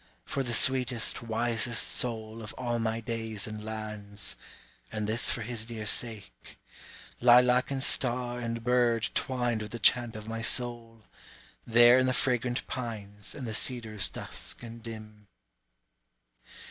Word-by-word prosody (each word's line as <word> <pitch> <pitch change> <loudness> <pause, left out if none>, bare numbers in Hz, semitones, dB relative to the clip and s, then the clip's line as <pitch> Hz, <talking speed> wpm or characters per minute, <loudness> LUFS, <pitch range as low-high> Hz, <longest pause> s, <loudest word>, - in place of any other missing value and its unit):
For 140 - -2
the 120 -3 0
sweetest, 125 -3 +3
wisest 115 0 0
soul 110 -2 -1
of 105 - -8
all 120 -2 -2
my 115 0 -1
days 110 -2 -4
and 110 0 -7
lands 105 -2 -5 0.6
and 110 -1 -3
this 110 +3 +2
for 115 - -3
his 115 0 -1
dear 110 -2 -6
sake, 105 -3 -2 0.6
Lilac 125 +1 +5
and 135 -1 0
star 125 -2 +1
and 115 -1 -4
bird 120 -2 +2
twined 120 -4 -1
with 105 - -6
the - - -3
chant 120 +1 +3
of 110 0 -8
my 115 0 -4
soul, 115 -2 -1 0.6
There 120 +2 +7
in 130 - +2
the 130 - +1
fragrant 125 -1 0
pines 105 -5 -6
and 135 - -6
the 110 - -4
cedars 110 -4 +1
dusk - - -5
and 115 0 -9
dim. 110 -2 -10
115 Hz, 145 wpm, -29 LUFS, 110-120 Hz, 0.6 s, There